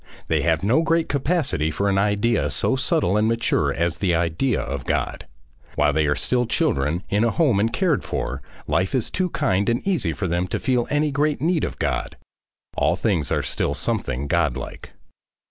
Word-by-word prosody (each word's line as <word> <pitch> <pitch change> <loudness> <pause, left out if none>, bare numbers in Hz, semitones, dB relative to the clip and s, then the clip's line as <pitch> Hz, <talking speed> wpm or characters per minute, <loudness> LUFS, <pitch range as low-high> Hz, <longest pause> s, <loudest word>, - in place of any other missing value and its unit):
They - - +2
have 80 0 +1
no 120 +10 +3
great 165 0 +1
capacity 140 - 0
for 100 +6 -1
an 95 -1 +2
idea 105 +3 +1
so 130 - +1
subtle 100 -7 +1
and 105 +1 +2
mature 115 0 +1
as 85 0 -1
the 90 -4 +1
idea 85 +10 0
of 70 0 -4
God. - - -2 0.5
While - - +2
they 80 -1 +2
are 75 - +2
still 125 -1 0
children 75 +4 0
in 105 +2 +2
a 115 - +3
home 130 - +2
and 110 +3 +1
cared 170 +1 +1
for, - - -3 0.2
life 95 +7 0
is 125 - -1
too 185 -1 0
kind 100 - 0
and 120 +9 -1
easy 150 - +1
for 80 - -4
them 90 +1 0
to - - -2
feel 125 -3 0
any 150 0 +1
great 145 +1 0
need 165 +1 +1
of - - -3
God. - - -2 0.6
All - - +2
things - - 0
are - - +1
still - - -1
something 65 +4 -2
God 70 - +1
like. - - -8
110 Hz, 195 wpm, -23 LUFS, 85-140 Hz, 0.6 s, no